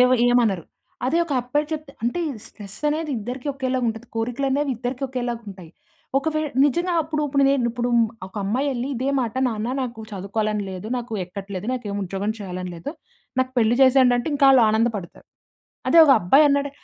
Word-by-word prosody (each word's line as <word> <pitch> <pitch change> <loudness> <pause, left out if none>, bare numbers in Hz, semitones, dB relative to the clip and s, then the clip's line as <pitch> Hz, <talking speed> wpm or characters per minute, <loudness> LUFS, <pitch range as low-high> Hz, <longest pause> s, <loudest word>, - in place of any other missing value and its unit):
ఏ‌వ 250 0 +6 0.2
ఏమనరు. 225 -8 +2 0.4
అదే 325 +6 +2
ఒక 315 - -5
అబ్బాయి 290 +5 -1
చెప్తే 310 -1 -5
అంటే 240 +9 -1
ఇ - - -1 0.2
స్ట్రెస్ 205 -1 -11
అనేది 305 0 -1
ఇద్దరికి 245 +5 -6
ఒకేలాగా 260 -2 -1
ఉంటది, 225 +2 -5
కోరికలు 245 +4 -1
అనేవి 285 +1 +1
ఇద్దరికి 250 +3 -4
ఒకేలాగుంటాయి. 230 -9 -5 0.5
ఒకవేళ 310 0 -1 0.2
నిజంగా 345 +6 +1
అప్పుడు 305 0 -2
ఇప్పుడు‌నే 275 0 +3 0.2
ఇప్పుడు 240 +1 -2 0.4
ఒక 190 - -17
అమ్మాయి 250 +9 0
ఎళ్లి 245 +2 -3
ఇదే 260 +3 -2
మాట, 230 -3 -3
"నాన్న 220 +1 -3
నాకు 235 -3 -5
చదువుకోవాలని 210 +2 -2
లేదు, 185 +2 -7
నాకు 240 -2 -6
ఎక్కట్లేదు, 195 +2 -7
నాకు 250 -2 -4
ఏమి 200 - -3
ఉద్యోగం 195 +3 -2
చేయాలని 185 -2 -5
లేదు, 170 +11 -6 0.5
నాకు 260 0 -1
పెళ్లి 230 +1 +3
చేసేయండి" 260 -1 +5
అంటే 245 - -2
ఇంకా 280 -1 +4
ఆళ్ళు 260 -3 +6
ఆనందపడతారు. 220 -5 -1 0.6
అదే 335 - +5
ఒక 275 - +7
అబ్బాయి 270 +13 +5
అన్నాడు 280 0 +1
245 Hz, 175 wpm, -23 LUFS, 210-275 Hz, 0.6 s, ఒక